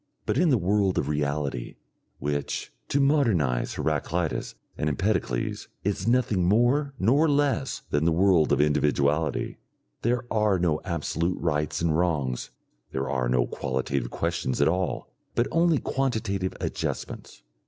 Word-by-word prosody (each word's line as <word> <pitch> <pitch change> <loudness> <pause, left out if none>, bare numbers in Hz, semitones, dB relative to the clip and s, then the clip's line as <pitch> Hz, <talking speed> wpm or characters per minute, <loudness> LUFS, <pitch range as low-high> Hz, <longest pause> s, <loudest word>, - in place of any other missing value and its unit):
But - - +1
in 175 -1 +4
the 130 - +4
world 100 0 +1
of 70 - 0
reality, 70 -4 -2 0.4
which 70 +1 -3
to 140 - +1
modernise 110 - +2
Heraclitus 85 -1 -1 0.2
and 75 - -1
Empedocles 75 - -1 0.2
is 100 +2 -1
nothing 115 -6 +2
more 120 +9 +2
nor 140 +11 +3
less 140 -3 +1
than 75 +2 +1
the 85 - +4
world 85 -2 +4
of 70 - +3
individuality, 75 +1 +1 0.4
there 120 +1 0
are 105 -3 +3
no 85 -3 +1
absolute 85 +1 -1
rights 75 -1 -1
and 80 -2 +2
wrongs, 75 -8 0 0.4
there 65 0 -2
are 65 -3 0
no - - +3
qualitative 65 -1 -2
questions 85 -4 -2
at - - +4
all, 90 +2 -1 0.2
but 120 - +2
only 165 -1 +3
quantitative 110 -10 -1
adjustments. - - -4
85 Hz, 135 wpm, -26 LUFS, 75-115 Hz, 0.4 s, in